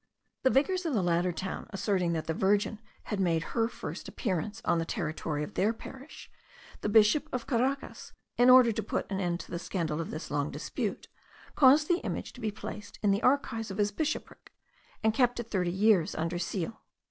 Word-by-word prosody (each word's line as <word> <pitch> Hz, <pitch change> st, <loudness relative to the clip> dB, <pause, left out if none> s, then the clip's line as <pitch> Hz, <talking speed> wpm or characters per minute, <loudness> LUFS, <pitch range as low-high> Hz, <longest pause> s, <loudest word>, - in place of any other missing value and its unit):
The 260 Hz, -, +4 dB
vicars 365 Hz, +8 st, +2 dB
of 295 Hz, -, 0 dB
the 200 Hz, -, +2 dB
latter 175 Hz, +1 st, +2 dB
town 185 Hz, +3 st, -5 dB
asserting 195 Hz, -4 st, 0 dB
that 160 Hz, -1 st, -2 dB
the 160 Hz, -, -1 dB
Virgin 205 Hz, +4 st, +1 dB, 0.2 s
had 210 Hz, -, -3 dB
made 165 Hz, -4 st, +2 dB
her 225 Hz, -1 st, +2 dB
first -, -, -7 dB
appearance 205 Hz, +1 st, -3 dB
on 170 Hz, -, +2 dB
the -, -, 0 dB
territory 155 Hz, -2 st, -3 dB
of -, -, -7 dB
their 210 Hz, +4 st, +2 dB
parish, 265 Hz, +5 st, -11 dB, 0.5 s
the -, -, -1 dB
Bishop 220 Hz, +8 st, +4 dB
of 250 Hz, -2 st, -3 dB
Caracas, 265 Hz, +2 st, -1 dB, 0.2 s
in 245 Hz, +1 st, +5 dB
order 255 Hz, -2 st, +8 dB
to 220 Hz, -, -2 dB
put 210 Hz, -, -2 dB
an 195 Hz, -, -1 dB
end 175 Hz, -2 st, -1 dB
to -, -, -13 dB
the 170 Hz, -, -3 dB
scandal 165 Hz, -4 st, -2 dB
of 165 Hz, -, -5 dB
this 155 Hz, -, -6 dB
long 145 Hz, 0 st, 0 dB
dispute, -, -, -4 dB, 0.5 s
caused 290 Hz, +2 st, +6 dB
the 350 Hz, 0 st, +2 dB
image -, -, -4 dB
to -, -, -12 dB
be 220 Hz, -, 0 dB
placed 210 Hz, 0 st, -8 dB
in 205 Hz, -, +4 dB
the 200 Hz, +2 st, +1 dB
archives 225 Hz, -5 st, +1 dB
of 195 Hz, -, -6 dB
his 205 Hz, -1 st, +1 dB
bishopric, 310 Hz, +8 st, -4 dB, 0.5 s
and 220 Hz, 0 st, +3 dB
kept 245 Hz, -1 st, +2 dB
it 230 Hz, -1 st, -6 dB
thirty 180 Hz, -4 st, +1 dB
years 190 Hz, -3 st, +3 dB
under 165 Hz, +2 st, -2 dB
seal. 185 Hz, +4 st, -3 dB
205 Hz, 200 wpm, -30 LUFS, 175-240 Hz, 0.5 s, order